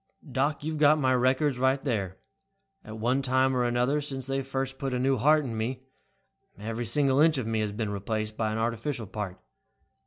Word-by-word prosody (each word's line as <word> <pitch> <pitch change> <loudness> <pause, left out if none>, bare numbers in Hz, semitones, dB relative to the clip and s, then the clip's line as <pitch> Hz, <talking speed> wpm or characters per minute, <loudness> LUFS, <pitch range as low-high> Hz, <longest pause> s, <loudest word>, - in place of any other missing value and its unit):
"Doc, 140 +3 0
you've 155 0 -3
got 150 +1 +6
my 130 -3 +2
records 130 +2 +2 0.2
there. 100 -9 -2 0.7
At 110 - -9
one 125 +5 +1
time 130 0 +2
or 125 - +2
another, 125 +4 +1
since 135 -3 -4
they 135 0 -1
first 135 0 -4
put 135 -3 -2
a - - -1
new 135 +1 +2
heart 150 +5 +3
in 115 -3 -4
me, 120 +4 -2 0.8
every 115 +3 -4
single 135 +3 +3
inch 160 0 +5
of 130 - -2
me 110 0 -1
has 105 -1 -1
been 105 0 -3
replaced 110 +2 -3
by 110 -1 -1
an 110 - -2
artificial 115 +2 -2
part. 100 -2 -6
130 Hz, 190 wpm, -28 LUFS, 110-135 Hz, 0.8 s, got